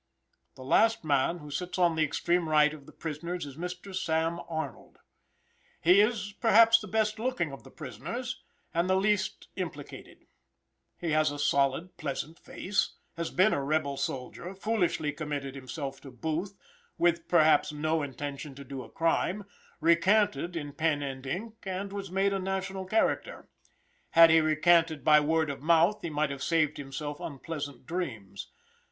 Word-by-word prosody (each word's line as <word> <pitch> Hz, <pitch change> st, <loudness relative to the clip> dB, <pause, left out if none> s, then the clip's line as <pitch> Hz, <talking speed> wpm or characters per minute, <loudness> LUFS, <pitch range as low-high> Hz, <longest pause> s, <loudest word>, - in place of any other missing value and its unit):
The 130 Hz, -, -10 dB
last 225 Hz, +11 st, +3 dB
man, 145 Hz, +2 st, +1 dB
who 150 Hz, -3 st, -10 dB
sits 180 Hz, +6 st, -4 dB
on 175 Hz, -2 st, +3 dB
the 160 Hz, -, 0 dB
extreme 170 Hz, +2 st, 0 dB
right 150 Hz, -1 st, +4 dB
of 145 Hz, -3 st, -12 dB
the -, -, -12 dB
prisoners, 170 Hz, +2 st, -5 dB
is 140 Hz, -2 st, -9 dB
Mr. 180 Hz, +4 st, -6 dB
Sam. 165 Hz, -2 st, 0 dB
Arnold. 160 Hz, -8 st, -5 dB, 0.8 s
He 180 Hz, +5 st, +6 dB
is, 210 Hz, -2 st, 0 dB
perhaps, 230 Hz, 0 st, +7 dB
the 215 Hz, -, -8 dB
best 215 Hz, +1 st, 0 dB
looking 245 Hz, -, -1 dB
of 135 Hz, -, -10 dB
the -, -, -13 dB
prisoners, 180 Hz, -, -6 dB, 0.3 s
and 170 Hz, +2 st, +1 dB
the 190 Hz, -, +4 dB
least 195 Hz, 0 st, 0 dB
implicated. -, -, -7 dB, 0.7 s
He 170 Hz, -2 st, -3 dB
has 155 Hz, 0 st, +3 dB
a 145 Hz, -, -5 dB
solid, 145 Hz, +4 st, +1 dB
pleasant 155 Hz, +2 st, -4 dB
face; 195 Hz, +1 st, -2 dB, 0.2 s
has 170 Hz, -1 st, -3 dB
been 190 Hz, +4 st, +3 dB
a 140 Hz, -, 0 dB
rebel 140 Hz, -1 st, 0 dB
soldier, 135 Hz, +7 st, -5 dB
foolishly 185 Hz, -7 st, 0 dB
committed 145 Hz, -2 st, -4 dB
himself 135 Hz, +1 st, -6 dB
to 140 Hz, -, -10 dB
Booth, 160 Hz, -, -4 dB, 0.4 s
with 170 Hz, -1 st, +2 dB
perhaps 155 Hz, -4 st, +4 dB
no 155 Hz, +2 st, 0 dB
intention 140 Hz, 0 st, -6 dB
to 140 Hz, -, -9 dB
do 135 Hz, -1 st, -7 dB
a -, -, -11 dB
crime, 170 Hz, +4 st, 0 dB, 0.4 s
recanted 170 Hz, 0 st, +3 dB
in 145 Hz, -3 st, -5 dB
pen 150 Hz, -1 st, 0 dB
and 135 Hz, -1 st, -6 dB
ink, 215 Hz, +10 st, -4 dB
and 195 Hz, +1 st, -4 dB
was 200 Hz, -1 st, -5 dB
made 195 Hz, +2 st, +1 dB
a 195 Hz, -, -1 dB
national 190 Hz, 0 st, -3 dB
character. 225 Hz, -, 0 dB, 0.6 s
Had 165 Hz, 0 st, +8 dB
he 160 Hz, 0 st, +6 dB
recanted 160 Hz, 0 st, +3 dB
by 150 Hz, 0 st, +7 dB
word 160 Hz, 0 st, +1 dB
of 135 Hz, -, -8 dB
mouth 170 Hz, +6 st, +3 dB
he 170 Hz, -, -3 dB
might 150 Hz, -1 st, 0 dB
have 140 Hz, -1 st, -6 dB
saved 155 Hz, -2 st, +1 dB
himself 145 Hz, +1 st, -5 dB
unpleasant 145 Hz, -3 st, -6 dB
dreams. 110 Hz, -, -5 dB
160 Hz, 160 wpm, -29 LUFS, 145-185 Hz, 0.8 s, Had